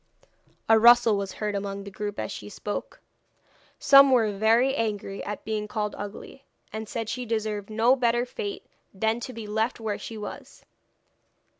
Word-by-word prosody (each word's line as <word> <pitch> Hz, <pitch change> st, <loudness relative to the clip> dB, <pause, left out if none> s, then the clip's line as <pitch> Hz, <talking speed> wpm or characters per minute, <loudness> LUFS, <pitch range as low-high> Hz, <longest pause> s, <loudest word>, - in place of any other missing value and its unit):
A 225 Hz, 0 st, +6 dB
rustle 235 Hz, -1 st, +7 dB
was 195 Hz, -1 st, -3 dB
heard 210 Hz, -1 st, -3 dB
among 200 Hz, 0 st, -4 dB
the 200 Hz, -, -9 dB
group 205 Hz, +1 st, -5 dB
as -, -, -3 dB
she -, -, -8 dB
spoke. -, -, -6 dB, 0.8 s
Some 275 Hz, 0 st, +7 dB
were 230 Hz, -5 st, +3 dB
very 230 Hz, +6 st, +3 dB
angry 205 Hz, -4 st, -3 dB
at 210 Hz, 0 st, -6 dB
being 215 Hz, -1 st, -2 dB
called 210 Hz, -1 st, -3 dB
ugly, 205 Hz, +6 st, -9 dB, 0.3 s
and 220 Hz, 0 st, -5 dB
said 225 Hz, -2 st, -4 dB
she 250 Hz, +2 st, -3 dB
deserved 215 Hz, -3 st, -3 dB
no 225 Hz, +4 st, +3 dB
better 240 Hz, -1 st, +1 dB
fate 405 Hz, -, -6 dB, 0.3 s
than 220 Hz, +4 st, 0 dB
to 250 Hz, -, -6 dB
be 230 Hz, -3 st, -8 dB
left 220 Hz, +4 st, -1 dB
where 215 Hz, -2 st, -3 dB
she 225 Hz, -, -7 dB
was. 210 Hz, -, -9 dB
220 Hz, 165 wpm, -26 LUFS, 210-240 Hz, 0.8 s, rustle